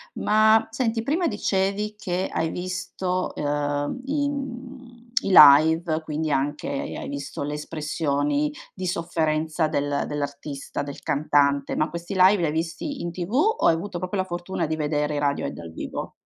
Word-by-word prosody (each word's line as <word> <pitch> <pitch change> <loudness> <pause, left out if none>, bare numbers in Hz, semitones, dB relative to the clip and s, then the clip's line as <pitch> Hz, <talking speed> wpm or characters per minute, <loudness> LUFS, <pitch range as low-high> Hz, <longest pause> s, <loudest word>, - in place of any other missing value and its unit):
Ma 215 +1 +4
senti, 225 -1 0
prima 330 +7 +1
dicevi 205 0 -1
che 185 -2 -2
hai 160 0 0
visto, 185 +1 -3
uhm, 145 - -1
i 285 +1 0
mhmm, 255 -3 -7 0.2
i - - -3
live, 160 +2 +7
quindi 155 0 -2
anche 145 +1 -1
hai 140 - -4
visto 140 0 -5
le 145 +1 -3
espressioni 150 -1 -1 0.2
di 185 - -5
sofferenza 160 -2 0
del 145 -1 0
dell'artista, 145 -1 -4
del 140 -1 -7
cantante, 140 -1 +1
ma 155 - +1
questi 170 +4 -6
live 185 +2 +6
li 170 - 0
hai 150 - 0
visti 165 - -3
in 170 - -3
TV 175 +3 -5
o 430 - +2
hai 165 - +6
avuto 180 +2 -5
proprio 185 +3 -3
la 185 - +1
fortuna 175 0 -3
di 160 - -1
vedere 150 -1 -1
i - - 0
Radiohead 145 -1 -1
dal 85 -1 -9
vivo? - - -6
165 Hz, 160 wpm, -24 LUFS, 145-200 Hz, 0.2 s, live